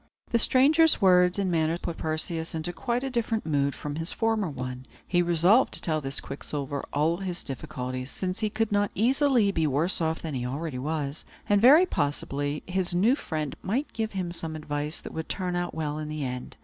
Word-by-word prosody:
The 235 - +3
stranger's 300 +7 +5
words 180 -2 +5
and 195 -2 0
manner 165 0 +1
put 170 -1 -5
Perseus 160 +1 -3
into 160 +2 -3
quite 235 +9 -2
a 270 - -2
different 230 -2 -1
mood 140 -3 +1
from 150 0 -5
his 165 +1 -3
former 225 -5 0
one. 130 -2 -6 0.2
He 175 -1 +3
resolved 175 +8 +4
to - - -2
tell 155 -2 -1
Quicksilver 140 +1 -3
all 155 +4 +1
his 185 -2 -4
difficulties, 130 -2 -5
since 185 +5 -3
he 215 -1 0
could 225 0 -1
not 205 0 +2
easily 250 -2 +3
be 160 -4 +1
worse 155 +7 +1
off 160 0 -1
than 160 -2 -4
he 125 -2 -2
already 135 +2 -3
was, 150 +1 -3 0.2
and, 205 -1 +3
very 295 +10 +8
possibly, 145 - -2
his 180 -1 -1
new 220 +9 +4
friend 155 - -4
might 250 +10 -2
give 220 -2 -2
him 185 -3 -2
some 165 -2 -5
advice 150 0 -4
that - - -9
would 160 0 -5
turn 180 -2 -2
out 175 0 -2
well 155 -1 -2
in 155 - -4
the 155 -1 -3
end. 125 -1 -6
165 Hz, 200 wpm, -27 LUFS, 150-205 Hz, 0.2 s, very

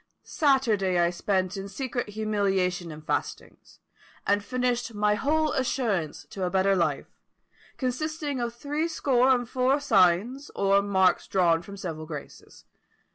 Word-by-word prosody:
Saturday 230 - +2
I 170 0 +3
spent 185 +1 -1
in 195 0 -6
secret 245 -1 -4
humiliation 195 -5 -1
and 155 0 -11
fastings, - - -4 0.5
and 205 0 +2
finished 245 -1 -1
my 210 0 +2
whole 300 +7 +1
assurance 225 - -1
to 195 - -5
a 180 - 0
better 190 +1 +2
life, 155 -6 -2 0.6
consisting 290 +2 -2
of 240 -1 -2
THREE 295 +6 -2
SCORE 265 -6 +2
and 245 -2 +2
FOUR 260 +3 +1
SIGNS, 225 +3 +2
or 200 0 +3
marks 190 -3 +2
drawn 170 -3 +2
from 200 +3 -10
several 160 -5 -6
graces. 150 -3 -10
205 Hz, 135 wpm, -26 LUFS, 185-255 Hz, 0.6 s, I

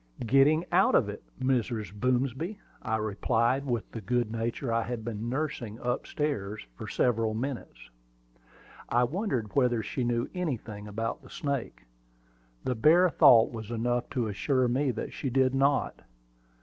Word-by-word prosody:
"Getting 140 +7 +4
out 180 +2 +4
of 105 - +3
it, 105 - -7 0.2
Mrs. 120 -6 -1
Boomsby," 130 - -1 0.2
I 110 - -1
replied, 115 +5 0
with 120 -4 -2
the 115 - -6
good 120 +2 0
nature 115 +2 -2
I 115 - +2
had 115 -1 -4
been 115 0 -4
nursing 125 -5 -3
up 125 +1 -2
stairs 110 - -3
for - - -8
several 115 -3 +1
minutes. 115 - -5 1.0
I 120 +1 +3
wondered 130 - -2
whether 125 -5 +2
she 130 - -3
knew 120 0 0
anything 115 - -4
about 115 +2 -3
the - - -15
snake. 130 - -4 0.8
The 130 - 0
bare 160 +9 +5
thought 115 -6 +6
was 110 -2 -7
enough 120 +1 -1
to 125 -3 -1
assure 125 +5 +1
me 130 +3 +1
that 125 - -4
she 135 - -3
did 130 +1 +2
not. 140 +1 +1
120 Hz, 150 wpm, -29 LUFS, 110-135 Hz, 1.0 s, thought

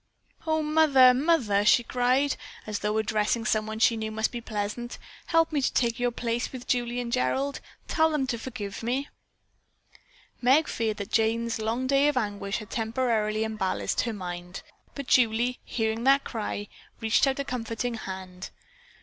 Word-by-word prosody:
"Oh, 315 0 +1
mother, 300 -5 +6
mother!" 250 -8 +2
she 240 +3 +5
cried, 255 +4 +1 0.3
as 210 -1 -3
though 210 +1 -1
addressing 220 +1 0
someone 215 0 0
she 230 +1 +4
knew 220 -1 -3
must 220 0 -1
be 240 - -5
present, 220 +2 -4 0.3
"help 330 -1 +3
me 295 -2 0
to - - +1
take 235 -1 0
your 245 0 +2
place 235 0 -2
with 255 -2 -8
Julie 245 0 0
and 240 -1 -4
Gerald. 270 - 0 0.3
Tell 320 0 +3
them 300 -4 0
to 240 -3 -3
forgive 215 -5 -6
me." 255 +5 -2 1.3
Meg 270 +5 +4
feared 220 -2 -2
that 200 - -6
Jane's 225 +1 +1
long 225 +4 -1
day 275 +2 +3
of 295 -3 +1
anguish 205 -3 -2
had 215 -2 -9
temporarily 220 -2 0
unbalanced 215 -4 -1
her 235 - -2
mind, 180 -2 -7 0.3
but 280 - -5
Julie, 245 0 +2
hearing 225 0 -2
that 275 +1 +5
cry, 210 -2 -4 0.3
reached 225 +4 +3
out 270 - 0
a 280 - -2
comforting 240 -2 -3
hand. 190 -3 -7
235 Hz, 165 wpm, -27 LUFS, 215-260 Hz, 1.3 s, mother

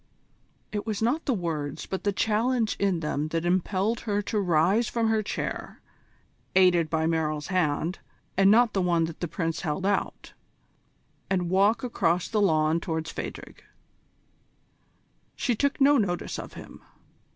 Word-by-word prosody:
It 210 +1 -4
was 215 -2 -2
not 265 +8 0
the 270 - +1
words 155 -6 -3
but 190 - -5
the 205 - +3
challenge 225 +3 +1
in 195 -4 +1
them 150 -1 -2
that 165 +1 -2
impelled 190 +5 0
her 205 -2 -1
to 210 - -1
rise 185 +5 +2
from 230 -1 0
her 220 -1 +2
chair, 210 - -5 0.8
aided 180 -4 +4
by 160 0 0
Merrill's 155 -1 -1
hand, 175 -1 0 0.4
and 195 +1 +5
not 230 +1 +5
the 195 - +1
one 170 -2 +2
that 165 0 -5
the 175 - -2
Prince 165 0 -3
held 165 +2 -2
out, 200 0 -2 1.0
and 180 -2 0
walk 200 +6 +3
across 180 -8 0
the 215 -2 0
lawn 160 -3 +3
towards 160 -1 -3
Phadrig. - - -8 1.7
She 245 - 0
took 280 +6 0
no 280 0 +5
notice 175 -5 -2
of - - -8
him. - - -11
185 Hz, 150 wpm, -27 LUFS, 165-215 Hz, 1.7 s, and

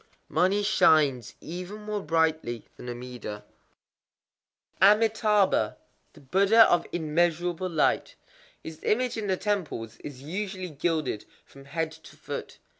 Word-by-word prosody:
_ - - -28 0.3
Money 190 +5 +2
shines 150 - +3
even 180 +5 -7
more 210 -1 -3
brightly 160 - 0
than 125 - -9
Amida. 120 -4 -7 1.4
Amitâbha, 210 - +4 0.4
the - - -16
Buddha 200 - +5
of 175 - +2
Immeasurable 175 +2 0
Light. 160 -3 +1 0.5
His 160 -1 -8
image 250 +3 +1
in 220 -2 -3
the 190 -1 +1
temples 160 - -3
is 135 -2 -10
usually 185 +2 -4
gilded 150 -6 -1 0.2
from 135 0 -16
head 160 +2 -2
to 160 -1 -15
foot. - - -7
170 Hz, 120 wpm, -27 LUFS, 145-200 Hz, 1.4 s, Buddha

